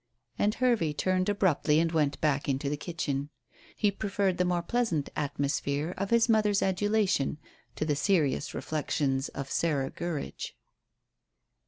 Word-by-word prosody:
And 210 +1 +2
Hervey 235 -12 +2
turned 185 +6 +1
abruptly 170 -6 +2
and 165 0 +1
went 150 -4 +1
back 145 -2 +1
into 140 +1 0
the 145 - 0
kitchen. 145 -3 -3 0.5
He 205 -2 +2
preferred 200 -2 -1
the 180 - +3
more 175 -1 0
pleasant 225 - 0
atmosphere 145 +2 -1
of 195 +1 -3
his 235 0 +4
mother's 210 -3 +3
adulation 190 -6 +1 0.4
to - - -2
the 150 -2 +1
serious 150 -3 +1
reflections 140 -3 -1
of 140 0 -6
Sarah 140 -5 0
Gurridge. 170 -4 -5
165 Hz, 140 wpm, -29 LUFS, 145-200 Hz, 0.5 s, his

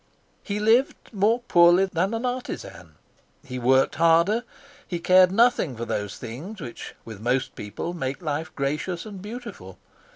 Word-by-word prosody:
He 205 0 -4
lived 225 +5 +3 0.2
more 220 +4 +2
poorly 175 -3 +5
than 190 +4 -1
an 230 +3 -3
artisan. 250 0 -6 0.5
He 130 -2 -6
worked 130 +2 +3
harder. 170 +8 +3 0.4
He 175 - -3
cared 185 +1 +5
nothing 210 - +2
for 115 - -4
those 105 -3 -3
things 145 - -8
which 120 -7 -8
with 110 -3 -9
most 130 +3 0
people 105 +11 -6
make 135 -5 -4
life 155 -1 -3
gracious 150 +6 -2
and 200 -3 -9
beautiful. 205 - -9
170 Hz, 150 wpm, -25 LUFS, 130-210 Hz, 0.5 s, poorly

